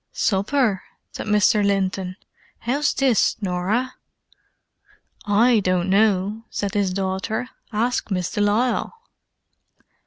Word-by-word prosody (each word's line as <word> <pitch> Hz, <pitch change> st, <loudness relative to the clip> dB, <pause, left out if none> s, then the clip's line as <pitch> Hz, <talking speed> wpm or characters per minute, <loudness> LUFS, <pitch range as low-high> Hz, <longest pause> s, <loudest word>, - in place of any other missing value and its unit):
"Supper?" 210 Hz, 0 st, +1 dB, 0.3 s
said -, -, -7 dB
Mr. 210 Hz, 0 st, +3 dB
Linton. 190 Hz, -2 st, -1 dB, 0.5 s
"How's 280 Hz, +5 st, 0 dB
this, 260 Hz, -6 st, +2 dB
Norah?" 200 Hz, +6 st, -1 dB, 1.3 s
"I 220 Hz, +3 st, +4 dB
don't 185 Hz, -1 st, 0 dB
know," 205 Hz, +1 st, +2 dB
said 200 Hz, -1 st, -3 dB
his 200 Hz, -3 st, +1 dB
daughter. 190 Hz, +5 st, -2 dB, 0.2 s
"Ask 230 Hz, +3 st, -1 dB
Miss 180 Hz, -3 st, -2 dB
de 210 Hz, -, -1 dB
Lisle!" 220 Hz, -, +1 dB
205 Hz, 100 wpm, -22 LUFS, 190-230 Hz, 1.3 s, I